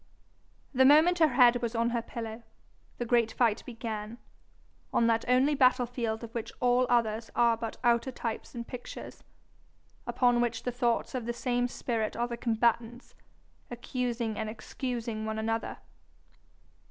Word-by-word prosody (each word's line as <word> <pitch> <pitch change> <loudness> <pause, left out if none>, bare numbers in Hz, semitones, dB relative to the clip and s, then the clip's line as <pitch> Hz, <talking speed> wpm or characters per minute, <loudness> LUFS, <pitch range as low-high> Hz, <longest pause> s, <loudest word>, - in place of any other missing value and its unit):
The 260 0 +4
moment 310 +6 +6
her 320 - +6
head 245 -3 +5
was 235 0 -2
on 235 +1 +1
her 235 -1 0
pillow 230 -1 -7 0.6
the 240 - -3
great 235 -1 +2
fight 230 -3 +1
began 225 -2 -5 0.7
on 235 - +2
that 230 0 +2
only 255 +4 +4
battle 255 -2 +4
field 235 -2 -3
of 230 0 -8
which 230 -2 -4
all 250 0 +3
others 230 -2 +1
are 235 -1 +4
but 225 -1 -6
outer 235 +2 +2
types 235 0 -5
and 235 0 -6
pictures, 250 -1 -9 0.8
upon 245 -1 +3
which 235 -1 -1
the 250 - -1
thoughts 240 -1 0
of 245 -3 -4
the 235 - -1
same 245 0 0
spirit 230 -3 -2
are 240 +1 -1
the 240 - -4
combatants, 235 +1 0 0.6
accusing 240 -2 -3
and 220 -1 -2
excusing 230 0 -4
one 220 0 -3
another. 225 +1 -2
235 Hz, 155 wpm, -29 LUFS, 225-245 Hz, 0.8 s, moment